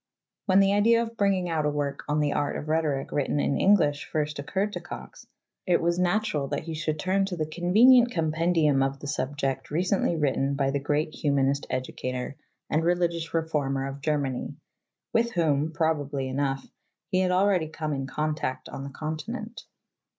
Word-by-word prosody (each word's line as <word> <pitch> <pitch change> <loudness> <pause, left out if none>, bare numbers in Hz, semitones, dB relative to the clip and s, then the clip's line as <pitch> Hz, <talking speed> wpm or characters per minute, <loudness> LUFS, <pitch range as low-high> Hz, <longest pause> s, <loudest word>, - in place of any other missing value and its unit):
When 190 0 +5
the 195 0 +3
idea 230 +3 +4
of 230 0 -7
bringing 195 -4 +1
out 160 -2 0
a - - +2
work 145 -1 -2
on 150 +1 +1
the 145 -1 +1
Art 145 - -1
of 150 - -6
Rhetoric 155 -4 0
written 145 0 0
in 140 - 0
Eng 205 +2 +7
lish 145 -6 0
first 150 -1 -2
occurred 195 +8 -2
to - - -3
Cox, - - -10 0.4
it 180 - +4
was 170 +1 0
natural 180 -5 +1
that 145 +1 -3
he 165 0 -5
should 155 0 -2
turn 190 +5 +1
to 190 -2 -4
the 155 - 0
convenient 220 +10 +5
compendium 160 - +2
of 135 0 0
the - - -9
subject 135 -1 -2
recently 175 +2 +1
written 140 -2 0
by 135 -1 +1
the 140 - 0
great 150 +2 -1
humanist 140 -1 0
educator 130 0 -4 0.3
and 155 +1 +1
religious 170 -1 0
reformer 150 -5 -1
of 135 +1 -6
Germany, 140 -4 -1 0.6
with 235 +1 +2
whom, 155 -3 +1
probably 145 -4 -1
enough, 135 0 -2 0.4
he 185 - +1
had 185 -1 +2
already 185 -2 +2
come 155 -1 -4
in 135 -1 -3
contact 150 -2 -3
on 135 - -6
the 140 - -6
continent. 215 - -6
155 Hz, 180 wpm, -27 LUFS, 140-180 Hz, 0.6 s, Eng